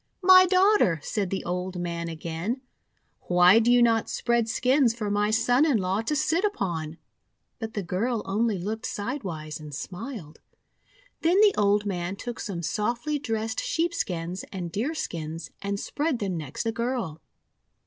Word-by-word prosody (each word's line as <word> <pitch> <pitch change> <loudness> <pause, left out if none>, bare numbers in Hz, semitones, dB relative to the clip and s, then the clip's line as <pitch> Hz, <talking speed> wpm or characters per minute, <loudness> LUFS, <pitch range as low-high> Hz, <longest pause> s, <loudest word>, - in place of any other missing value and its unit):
"My 370 0 +8
Daughter," 370 - +4
said 200 -3 -2
the 195 - -3
old 180 +1 -3
man 170 -1 -3
again, 165 - -4 0.7
"why 180 +4 +6
do 235 +1 +3
you 245 0 +6
not 225 -2 +2
spread 235 -1 0
skins 250 0 +3
for 210 -3 -3
my 205 +1 +1
son 245 +5 +3
in 295 -7 +3
law 190 +1 0
to 265 +7 -1
sit 325 +6 +1
upon?' 170 - -2 0.6
But 225 -1 -6
the 205 - -2
girl 210 +6 -1
only 210 +2 0
looked 215 +6 -4
sidewise 195 - -4
and 150 -2 -8
smiled. 185 - -7 0.8
Then 350 +4 +3
the 420 -2 +6
old 205 0 +2
man 180 -1 -2
took 240 +4 -6
some 180 -6 -4
softly 240 - -1
dressed 225 -3 -2
sheepskins 185 - -2
and 180 -3 -5
deerskins 170 - -4
and 200 0 -2
spread 295 +3 -1
them 195 -5 -2
next 150 -5 -4
the 225 - 0
girl. 230 -9 -3
210 Hz, 155 wpm, -26 LUFS, 180-245 Hz, 0.8 s, My